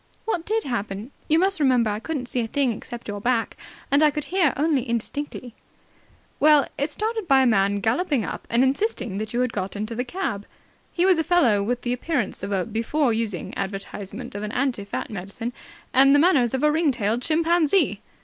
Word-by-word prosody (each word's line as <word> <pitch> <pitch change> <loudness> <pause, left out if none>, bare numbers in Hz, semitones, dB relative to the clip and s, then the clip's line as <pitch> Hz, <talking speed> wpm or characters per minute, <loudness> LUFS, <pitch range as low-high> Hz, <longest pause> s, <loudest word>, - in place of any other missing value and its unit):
"What 355 -7 -2
did 440 +1 0
happen? 215 -1 -4 0.2
You 315 - +4
must 385 +1 +2
remember 250 -6 +3
I 205 - -3
couldn't 280 +1 -4
see 245 - -3
a 230 - -1
thing 270 +1 +1
except 235 +2 -8
your 205 -1 -5
back, 235 0 0 0.4
and 280 +2 +4
I 305 - +6
could 300 0 -3 0.3
only 295 -2 +2
hear 235 - -9
indistinctly." 245 +1 -4 0.9
"Well, 300 -1 +6
it 285 +3 -1
started 435 +4 -3
by 270 -2 +5
a - - +3
man 200 -3 +2
galloping 255 - +1
up - - -6
and 235 +2 +3
insisting 265 - -1
that 215 0 -4
you 240 - 0
had 250 -2 -1
got 190 0 -3
into 215 +3 -4
the 245 +2 -2
cab. 250 - -4 0.4
He 350 - +1
was 370 -3 +4
a - - +2
fellow 290 - +3
with 245 +4 -2
the 245 - 0
appearance 250 -2 -2
of 195 +2 -4
a 190 -2 0
before 230 +4 0
using 220 -6 -3
advertisement 200 +4 -5
of 205 - -5
an 210 +1 -5
anti 250 -6 -1
fat 200 - -5
medicine 210 +5 -5 0.4
and 275 +2 +6
the - - +5
manners 280 -8 +3
of 265 - -2
a 300 - +5
ring 315 0 +2
tailed 230 -2 0
chimpanzee." 330 +4 +2
250 Hz, 205 wpm, -24 LUFS, 215-300 Hz, 0.9 s, I